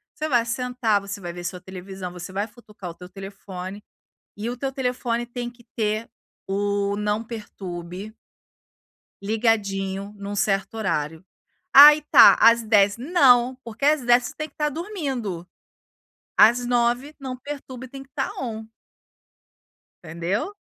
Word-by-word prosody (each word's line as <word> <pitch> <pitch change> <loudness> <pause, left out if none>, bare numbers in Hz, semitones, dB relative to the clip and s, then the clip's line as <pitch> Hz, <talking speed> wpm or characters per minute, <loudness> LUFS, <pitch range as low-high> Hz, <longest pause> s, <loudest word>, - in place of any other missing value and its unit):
Você 310 0 -3
vai 240 -4 +3
sentar, 235 -3 0
você 200 +1 -7
vai 175 -1 -6
ver 175 - -8
sua 180 -1 -4
televisão, 190 0 -8
você 180 +1 -8
vai 200 +2 -1
futucar 210 -5 -11
o - - -12
teu 180 +1 -12
telefone 195 0 -8 0.5
e 220 +3 -3
o 245 - -5
teu 270 +2 -3
telefone 250 -3 -2
tem 240 0 -5
que 240 0 -20
ter 215 0 -1 0.4
o 200 +1 0
não 210 +2 -1
perturbe 195 -3 -8 1.1
ligadinho 200 -2 -1
num 200 0 -5
certo 195 +1 0
horário. 160 -6 -2 0.5
Aí 295 +2 +10
tá. - - +9
Às 230 0 +6
10 205 -1 +3
não, 255 -4 +4
porque 230 +4 -4
às 300 -1 +4
10 245 0 +4
você 295 - -7
tem 305 0 -4
que - - -38
estar 300 -1 0
dormindo. 270 - -4 0.9
Às 240 +3 +6
9 240 +2 +1
o - - -27
não 260 -2 -6
perturbe 260 -2 -8
tem 270 0 -9
que 270 - -26
estar 270 0 -3
on 220 -3 -5 1.4
entendeu? 175 - -3
220 Hz, 150 wpm, -23 LUFS, 195-250 Hz, 1.4 s, Aí